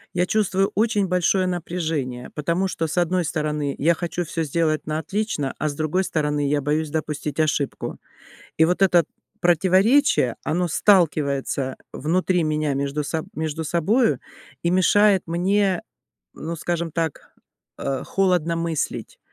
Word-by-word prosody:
Я 180 - +2
чувствую 195 -1 +1
очень 210 -2 +2
большое 180 +1 +2
напряжение, 160 -8 -3
потому 170 +5 0
что, 165 -3 -2
с 155 - -5
одной 175 +1 +2
стороны, 150 -2 -2
я 170 +4 +3
хочу 175 +1 -3
всё 165 +1 -2
сделать 155 +1 0
на 155 0 -2
отлично, 195 -8 -2
а, 155 - -1
с 145 - -4
другой 155 +5 0
стороны, 150 -4 -1
я 145 -1 +1
боюсь 150 +2 0
допустить 150 -1 -3
ошибку. 150 -3 -1 0.6
И 160 - +6
вот 180 +3 0
это 175 -4 +5 0.3
противоречие- 185 - +3
оно 175 +2 0
сталкивается 145 -8 +2 0.2
внутри 180 +3 +1
меня 155 -2 0
между 140 +2 -2
соб 160 +2 -3
между 160 +1 -3
собою 200 - +2 0.4
и 170 - +2
мешает 190 +2 +4
мне, 185 +2 +1 0.5
ну, 165 +2 -5
скажем 170 0 -2
так, 165 -2 -3 0.4
э, 135 -1 -3
холодно 180 -4 +1
мыслить. 165 -2 -3
165 Hz, 140 wpm, -23 LUFS, 150-185 Hz, 0.6 s, И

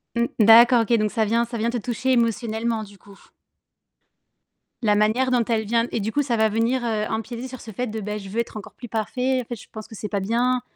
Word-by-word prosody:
Mmh. 235 0 +2
D'accord, 230 +3 +7
OK, 225 +1 0
donc 215 -1 0
ça 225 -2 +1
vient 230 +3 +1
ça 235 0 -6
vient 230 +2 0
te 240 - -2
toucher 245 +3 -2
émotionnellement, 230 -1 0
du 205 -1 -14
coup? 200 0 -17 1.6
La 210 -3 +3
manière 220 +5 +2
dont 250 -2 +2
elle 225 -1 -1
vient 230 +2 +1
et - - -1
du 215 +1 -3
coup 290 - +2
ça 250 -5 -1
va 220 0 +4
venir, 230 +4 0
heu, 215 -2 -1
empiéter 235 +3 -4
sur 255 -1 -9
ce 225 - -10
fait 245 +5 -3
de, 220 0 -5
beh: 210 0 -4
«Je 195 -1 -10
veux 220 +4 -3
être 235 - -3
encore 210 - -10
plus 240 - -10
parfait, 250 +4 -1
en - - -7
fait, 240 +1 -6
je - - -16
pense 215 -1 -9
que 220 - -11
c'est 210 - -5
pas 200 -1 -2
bien», 245 +5 +1
230 Hz, 250 wpm, -23 LUFS, 215-240 Hz, 1.6 s, D'accord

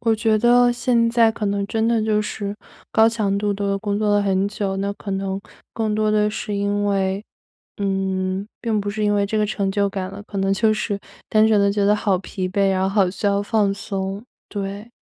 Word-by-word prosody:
我 230 -1 +2
觉 220 0 +2
得 245 +2 +5
现 240 -1 +2
在 230 -1 +4
可 220 -1 -3
能 200 0 0
真 225 0 0
的 230 -1 +2
就 215 -1 +2
是 205 -1 -4 0.4
高 220 0 +5
强 210 -4 0
度 205 0 0
地 200 0 -1
工 205 0 -2
作 210 -1 +2
了 - - +3
很 195 0 +1
久， 195 -2 -3
那 200 +1 -1
可 200 -1 -6
能 195 0 -2 0.3
更 220 -2 -1
多 215 0 +1
的 210 0 +3
是 210 0 -4
因 205 0 0
为 195 +1 0 0.5
嗯， 190 -1 -1 0.2
并 220 -3 0
不 205 - -3
是 215 +1 -2
因 205 - +2
为 200 0 +2
这 215 +2 -1
个 210 - +2
成 200 -2 -1
就 200 0 +1
感 190 -1 -4
了， 195 - -9
可 200 - -6
能 195 0 +1
就 215 +2 +2
是 210 -1 -2 0.3
单 215 0 +4
纯 215 -2 +4
地 200 - +3
觉 205 0 +1
得 205 +1 +4
好 200 -3 +1
疲 185 0 -4
惫， 195 +1 +2
然 185 0 0
后 190 - +2
好 195 -1 +3
需 195 +3 -8
要 200 0 +3
放 205 -1 +1
松， 195 +1 -4 0.2
对。 200 +2 -5
205 Hz, 245 characters per minute, -21 LUFS, 195-215 Hz, 0.5 s, 得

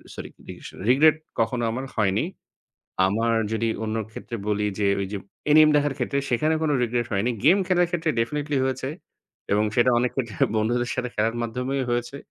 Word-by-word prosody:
Sorry - - -7 0.2
রিগ্রেশ - - -9 0.2
regret 150 +5 +6 0.2
কখনো 115 +1 0
আমার 130 +3 -4
হয়নি। 105 +2 +1 0.8
আমার 115 +4 +1 0.2
যদি 115 +1 0 0.2
অন্য 110 0 -2 0.2
ক্ষেত্রে 115 - -7
বলি 105 0 0
যে 105 - +1 0.2
ওই - - -1
যে 105 - -2 0.3
এনিম 155 0 +7
দেখার 145 -1 +1
ক্ষেত্রে 140 - -1
সেখানে 150 +6 +2
কোনো 150 - +1
রিগ্রেট 120 0 -1
হয়নি। 105 +5 +1
গেম 180 +5 +7
খেলার 180 -1 +3
ক্ষেত্রে 165 -2 -1
ডেফিনিটলি 145 +5 -1
হয়েছে 130 0 -2 0.7
এবং 105 +1 +2
সেটা 125 0 +4
অনেক 125 0 0
ক্ষেত্রে 115 -8 -3 0.2
বন্ধুদের 120 +3 0
সাথে 125 -1 -2
খেলার 110 +2 0
মাধ্যমেই 125 +4 -2
হয়েছে। 120 +3 -2
120 Hz, 170 wpm, -24 LUFS, 115-140 Hz, 0.8 s, এনিম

